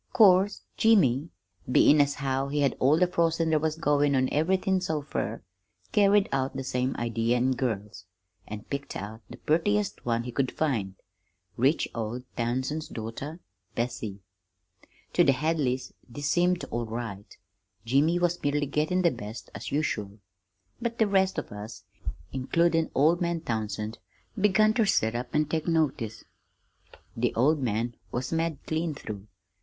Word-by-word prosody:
'Course, 200 -2 +5
Jimmy, 165 - +4 0.4
bein' 145 +4 +6
as 140 0 +1
how 135 0 -1
he'd 145 +1 -1
had 140 -3 +2
all 140 +4 +4
the 180 - +5
frostin' 165 -2 +1
there 155 - +4
was 155 0 0
goin' 145 -3 +2
on 130 0 +2
everythin' 185 +4 +2
so 155 -5 -2
fur, 115 -6 -3 0.5
carried 205 -1 +4
out 135 0 -1
the 135 - -3
same 125 0 -1
idea 115 +1 0
in 125 +2 +2
girls, 105 -8 -3 0.4
an' 105 -1 -6
picked 140 0 -5
out 110 +3 -6
the - - -9
purtiest 200 +6 0
one 115 -1 0
he 125 - -5
could 130 +1 0
find 110 -11 -1 0.6
rich 135 +7 +2
old 115 +2 -4
Townsend's 130 +6 -1
daughter, 135 +9 -6 0.3
Bessie. 115 -4 -3 0.9
"To - - +5
the 135 - +5
Hadleys 135 -3 -1 0.2
this 145 +5 -6
seemed 175 +3 +2
all 120 -1 -2
right 110 -3 -6 0.5
Jimmy 145 +8 +3
was 175 0 0
merely 145 0 +1
gettin' 155 +6 0
the 170 - +4
best, 115 -1 -8
as - - -6
usual; 105 -9 -1 0.6
but 235 0 -2
the 220 - +4
rest 190 -2 +2
of - - -4
us, 105 +2 -8 0.5
includin' 165 +5 +2
old 160 +6 +4
man 170 -1 0
Townsend, 110 -3 -3 0.4
begun 215 +1 +4
ter 225 -1 +3
sit 110 - +2
up 120 +1 -3
an' 150 0 +3
take 160 +1 -2
notice. 150 -9 0 0.9
The 120 +1 0
old 145 +5 +3
man 120 0 -1 0.2
was 125 +1 -3
mad 165 -2 0
clean 160 -1 -1
through. 105 -5 -7
140 Hz, 155 wpm, -28 LUFS, 120-165 Hz, 0.9 s, bein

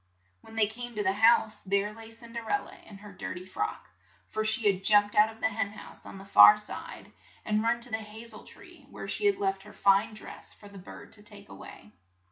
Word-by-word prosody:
When 225 - -14
they 220 -1 +4
came 240 +3 -6
to 210 - -1
the 190 -1 +2
house, 220 0 +4
there 200 +2 0
lay 225 0 -11
Cin 230 +1 -10
der 230 -1 -6
el 410 - +1
la - - -13
in 205 - -14
her 205 0 -12
dir 185 - -6
ty 180 0 -8
frock, 420 - -4 0.4
for 215 - -2
she 220 +1 -1
had 195 -2 +2
jumped 205 0 +4
out 210 +1 +5
of 225 - -17
the 220 - +2
hen 205 -1 -3
house - - -9
on - - -9
the 195 - -11
far 210 +1 +9
side, 210 - -7 0.3
and 215 0 +1
run 230 +1 +1
to 240 0 -1
the 220 0 -2
ha 215 +2 -11
zel 220 -2 -8
tree, - - -16
where - - -8
she 415 - 0
had 400 -1 +2
left 390 -1 -1
her - - -14
fine 200 +3 +3
dress - - -10
for 205 - -15
the 200 -1 -12
bird 185 - -12
to 215 - -10
take 205 -1 -10
a - - -10
way. 100 - -13
215 Hz, 250 wpm, -29 LUFS, 205-225 Hz, 0.4 s, far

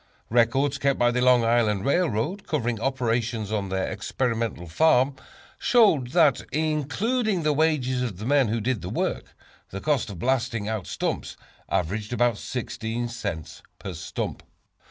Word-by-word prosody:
Records 135 +4 +2
kept 140 -1 +2
by 120 0 +3
the 125 +1 0
Long 125 -1 +5
Island 110 -4 +2
Railroad, 170 - 0
covering 120 -7 -1
operations 115 -4 -1
on 100 -3 -1
their 95 0 -1
Experimental 115 -8 -2
Farm, 130 - +3 0.4
showed 205 - +4
that, 155 -6 +4
including 170 - 0
the 150 0 +2
wages 140 -5 +1
of 115 -8 -3
the 105 - -6
men 140 -1 +3
who 115 +2 0
did 115 0 -1
the 90 - -5
work, - - -3 0.3
the 100 - -6
cost 145 -2 0
of 100 - -7
blasting 120 0 0
out 110 -4 -3
stumps - - -3 0.3
averaged 105 +6 -1
about 120 -3 +2
16 120 -1 -4
cents 100 -10 -5 0.2
per - - -6
stump. - - -5
120 Hz, 150 wpm, -25 LUFS, 110-140 Hz, 0.4 s, Long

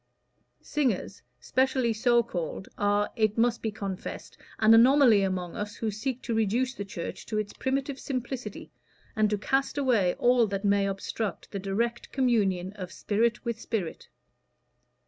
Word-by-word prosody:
Singers, 245 -9 -1 0.2
specially 260 - +1
so 240 +1 +3
called, 180 -4 -5
are, 205 0 +1
it 215 -1 +1
must 235 0 +2
be 220 - -1
confessed, 195 -3 -6 0.2
an 220 +1 +6
anomaly 240 -2 +6
among 185 -3 -2
us 210 0 -4
who 220 -2 -2
seek 245 +5 -4
to 235 - -2
reduce 225 +4 +1
the 200 - -5
Church 195 -4 -6
to 215 - -2
its 210 -1 -2
primitive 270 +1 -2
simplicity, 250 -4 -5 0.4
and 215 -1 +3
to 210 - 0
cast 270 +7 0
away 235 -10 +2
all 245 -2 +4
that 200 +1 -3
may 200 0 +3
obstruct 195 0 -4
the 200 - -3
direct 230 +5 -2
communion 200 -8 +1
of 185 -3 -7
spirit 230 +4 0
with 235 -1 -3
spirit." 195 -8 -4
220 Hz, 150 wpm, -28 LUFS, 200-245 Hz, 0.4 s, an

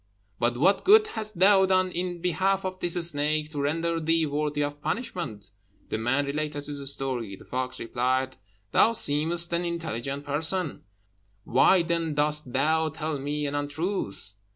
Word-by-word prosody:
But 120 +1 +1
what 195 +9 +3
good 430 +2 +7
hast 215 -3 -6
thou 190 +1 +5
done 185 -1 +2
in 175 0 -3
behalf 190 +3 +1
of 185 0 -4
this 175 -1 0
snake, 150 0 -1
to 145 -2 -3
render 165 +3 0
thee 165 0 +2
worthy 150 0 -1
of 145 0 -5
punishment?" 160 - -4 0.4
The 110 - -2
man 135 +5 +1
related 145 0 -3
his 140 -2 -2
story. 125 -8 -3
The - - -16
fox 130 0 -3
replied, 130 +3 -1 0.4
"Thou 230 - +4
seemest 170 0 +2
an 170 +1 +1
intelligent 145 -5 -4
person, 160 +3 -1 0.6
why 170 - +4
then 165 -2 -1
dost 150 -2 0
thou 160 +5 +2
tell 155 -1 -4
me 145 +2 -2
an 140 - -3
untruth? 145 - -3
150 Hz, 155 wpm, -26 LUFS, 140-175 Hz, 0.6 s, good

